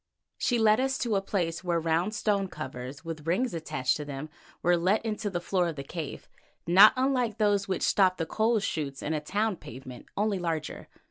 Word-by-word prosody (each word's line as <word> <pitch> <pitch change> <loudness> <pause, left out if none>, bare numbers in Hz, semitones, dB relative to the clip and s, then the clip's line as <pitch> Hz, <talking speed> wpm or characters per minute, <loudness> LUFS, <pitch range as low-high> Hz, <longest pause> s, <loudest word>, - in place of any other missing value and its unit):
She 245 - +1
led 220 0 +4
us 265 0 0
to 235 -4 0
a 195 - +2
place 175 -4 -2
where 175 -2 +1
round 165 +6 0
stone 205 -2 +1
covers 130 -1 -7
with 160 -2 -6
rings 210 +7 +1
attached 155 -6 -1
to 150 - -5
them 145 +1 -7 0.3
were 175 +1 +4
let 185 +6 +1
into 210 -1 -2
the 180 -3 -2
floor 180 0 0
of 165 - -4
the 140 - -6
cave, 155 +1 -6 0.4
not 190 +5 +8
unlike 255 -4 +1
those 205 -2 +2
which 190 -2 -1
stop 185 -2 +3
the 165 - -1
coal 220 +6 +1
shoots 145 -8 -3
in 155 - -1
a 155 - -1
town 205 +5 -1
pavement, 125 0 -10
only 205 -1 +1
larger. 165 -3 -3
180 Hz, 200 wpm, -28 LUFS, 160-210 Hz, 0.4 s, not